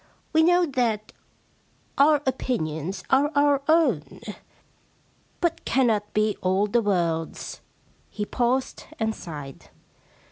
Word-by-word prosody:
We 320 Hz, -, +5 dB
know 350 Hz, +2 st, +4 dB
that 235 Hz, -7 st, -1 dB, 0.8 s
our 290 Hz, +1 st, +4 dB
opinions 190 Hz, -, -2 dB
are 280 Hz, +3 st, +4 dB
our 285 Hz, -1 st, +3 dB
own, 320 Hz, +1 st, +2 dB, 1.2 s
but 340 Hz, -1 st, -1 dB
cannot 220 Hz, -6 st, +1 dB
be 215 Hz, 0 st, +2 dB
all 190 Hz, +2 st, +2 dB
the 230 Hz, +3 st, +1 dB
world's.' 170 Hz, -6 st, -2 dB, 0.5 s
He 210 Hz, -, -4 dB
paused 250 Hz, +4 st, -1 dB
and 220 Hz, -1 st, 0 dB
sighed. 145 Hz, -8 st, -9 dB
235 Hz, 105 wpm, -25 LUFS, 195-285 Hz, 1.2 s, We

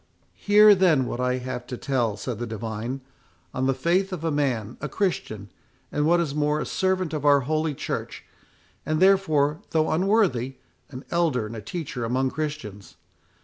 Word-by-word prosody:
"Hear, 210 Hz, 0 st, +6 dB
then, 175 Hz, -9 st, +3 dB
what 120 Hz, -, -4 dB
I 125 Hz, 0 st, +1 dB
have 125 Hz, -1 st, -6 dB
to 125 Hz, -, -5 dB
tell," 120 Hz, -7 st, -1 dB
said 115 Hz, +2 st, -5 dB
the 120 Hz, -, -3 dB
divine, 115 Hz, +3 st, -5 dB, 0.5 s
"on 130 Hz, +1 st, 0 dB
the 135 Hz, -, +3 dB
faith 180 Hz, +8 st, +1 dB
of 175 Hz, -4 st, -5 dB
a 165 Hz, -, 0 dB
man, 125 Hz, -7 st, -1 dB
a 150 Hz, -, -3 dB
Christian, 110 Hz, -, -2 dB, 0.4 s
and, 150 Hz, +1 st, 0 dB
what 175 Hz, +1 st, +4 dB
is 160 Hz, -5 st, -1 dB
more, 150 Hz, 0 st, +1 dB
a -, -, -2 dB
servant 185 Hz, -3 st, -1 dB
of 150 Hz, -2 st, -3 dB
our 145 Hz, -1 st, +5 dB
Holy 155 Hz, +2 st, -1 dB
Church; -, -, -5 dB, 0.6 s
and, 155 Hz, 0 st, -1 dB
therefore, 160 Hz, -6 st, +3 dB
though 160 Hz, -1 st, +1 dB
unworthy, 160 Hz, -, +1 dB, 0.3 s
an 130 Hz, 0 st, -9 dB
elder 160 Hz, -9 st, +1 dB
and 110 Hz, +2 st, -7 dB
a 110 Hz, -, -6 dB
teacher 130 Hz, -, -5 dB
among 130 Hz, +3 st, 0 dB
Christians. 145 Hz, -11 st, -6 dB
145 Hz, 175 wpm, -25 LUFS, 125-165 Hz, 0.6 s, Hear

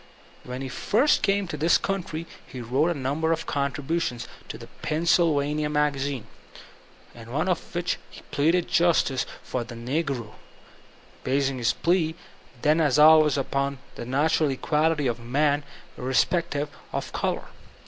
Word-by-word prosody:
When 125 Hz, +1 st, -6 dB
he -, -, -3 dB
first 225 Hz, -, +2 dB
came 200 Hz, -1 st, +1 dB
to 155 Hz, -, -5 dB
this 160 Hz, +4 st, +4 dB
country 170 Hz, -4 st, -3 dB, 0.2 s
he 130 Hz, -, -8 dB
wrote 130 Hz, +7 st, +1 dB
a 170 Hz, -, -1 dB
number 145 Hz, +5 st, 0 dB
of 165 Hz, 0 st, -1 dB
contributions 140 Hz, -1 st, -2 dB, 0.2 s
to -, -, -6 dB
the -, -, -10 dB, 0.2 s
Pennsylvania 155 Hz, -2 st, +2 dB
Magasine, 140 Hz, -4 st, 0 dB, 0.9 s
in 115 Hz, 0 st, -11 dB
one 155 Hz, +7 st, 0 dB
of 180 Hz, 0 st, -2 dB
which 175 Hz, 0 st, -1 dB
he -, -, -13 dB
pleaded 165 Hz, +5 st, +2 dB
justice 165 Hz, -7 st, +2 dB, 0.2 s
for 125 Hz, -, -3 dB
the 120 Hz, 0 st, -10 dB
n^ro, 125 Hz, -2 st, -3 dB, 0.9 s
basing 135 Hz, 0 st, 0 dB
his 120 Hz, 0 st, +2 dB
plea 165 Hz, -2 st, +1 dB, 0.5 s
then 155 Hz, +2 st, +4 dB
as 145 Hz, -4 st, +3 dB
always 155 Hz, -1 st, +7 dB
upon 140 Hz, 0 st, -1 dB, 0.2 s
the -, -, -7 dB
natural 145 Hz, +5 st, +2 dB
equality 150 Hz, +2 st, +1 dB
of 120 Hz, -2 st, -1 dB
man 145 Hz, +5 st, +1 dB, 0.4 s
irre 130 Hz, +1 st, -2 dB
spective 160 Hz, -4 st, +1 dB, 0.2 s
of -, -, -4 dB
color. -, -, -2 dB
150 Hz, 145 wpm, -25 LUFS, 130-165 Hz, 0.9 s, always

